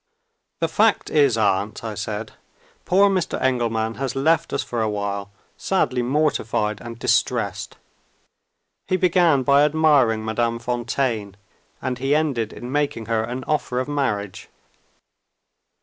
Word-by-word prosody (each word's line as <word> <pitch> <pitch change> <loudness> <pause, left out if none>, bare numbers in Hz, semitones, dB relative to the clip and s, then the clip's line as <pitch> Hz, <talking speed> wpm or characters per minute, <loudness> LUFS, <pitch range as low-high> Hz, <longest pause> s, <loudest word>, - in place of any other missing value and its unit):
"The 165 - +2
fact 210 +6 +2
is, 140 -6 +3
aunt," 105 0 0
I 110 -2 -4
said, 105 +1 -5 0.5
"poor 195 +2 +5
Mr. 185 -3 -1
Engelman 115 -3 0
has 135 0 -2
left 160 +5 +2
us - - -1
for 120 -2 -3
awhile, 100 -2 -2 0.3
sadly 130 -10 0
mortified 120 -6 0
and 115 -1 -8
distressed. - - 0 1.1
He 185 - +1
began 175 -6 +3
by 140 +2 +5
admiring 145 -8 +3
Madame 115 +1 0
Fontaine; 120 -3 -2 0.5
and 125 -1 -2
he 135 +3 +1
ended 135 -8 0
in 120 +1 -8
making 145 -6 -1
her 115 -1 0
an 125 +3 -5
offer 135 -3 -1
of 130 - -2
marriage." 115 -10 -2
125 Hz, 130 wpm, -22 LUFS, 110-145 Hz, 1.1 s, poor